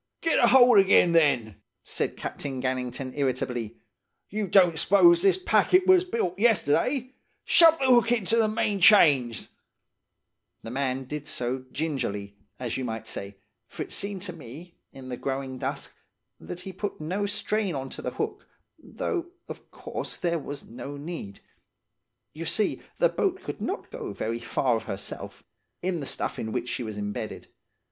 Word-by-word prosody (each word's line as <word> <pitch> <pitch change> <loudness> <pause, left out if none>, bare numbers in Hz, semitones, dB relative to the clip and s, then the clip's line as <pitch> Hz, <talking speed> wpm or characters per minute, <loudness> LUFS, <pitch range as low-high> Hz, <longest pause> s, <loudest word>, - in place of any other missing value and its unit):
"'Get 330 -2 +2
a - - +5
hold 245 -4 +7
again, 190 -2 +5
then!' 140 -10 +2 0.2
said - - -3
Captain 135 -2 -5
Gannington 130 0 -3
irritably. 125 -5 -2 0.5
'You 210 0 -2
don't 175 -4 +4
s'pose 340 - +5
this 390 0 +4
packet 365 0 +3
was 370 -1 +5
built 190 - -2
yesterday! 240 - +2 0.3
Shove 330 -1 +6
the 270 - -1
hook 240 -2 +5
into 225 -2 +1
the 225 -1 +3
main 210 -2 0
chains' 150 - +5 1.1
The 115 - -7
man 135 0 -1
did 150 +3 -6
so 125 0 -3
gingerly, 120 -10 -3 0.2
as 125 -2 -3
you 130 - -3
might 110 -2 -4
say, 100 0 -6 0.3
for - - -5
it - - -11
seemed 200 -2 -3
to 185 -3 -5
me, 165 +3 -11 0.2
in 130 -1 -11
the 125 - -4
growing 135 -1 -4
dusk, - - -4 0.5
that 180 0 -8
he 190 - -8
put 200 +2 -5
no 185 +7 -2
strain 210 -3 -1
on 135 -1 -5
to - - -8
the - - -3
hook, - - -4 0.3
though, 350 -4 -4 0.2
of - - -10
course - - -6
there 170 -2 -1
was 145 -1 -7
no 135 +5 -8
need–you 155 - -11
see 175 +6 0 0.2
the - - +4
boat 380 -1 -1
could - - -6
not - - -4
go 430 -5 -6
very 115 +1 -3
far 120 +1 0
of - - -7
herself, 95 +1 -7 0.4
in 180 -2 -1
the 140 - -5
stuff - - -3
in 110 - -4
which 125 +1 -3
she - - -3
was 110 -3 -5
imbedded. 105 0 -5
160 Hz, 165 wpm, -26 LUFS, 125-210 Hz, 1.1 s, hold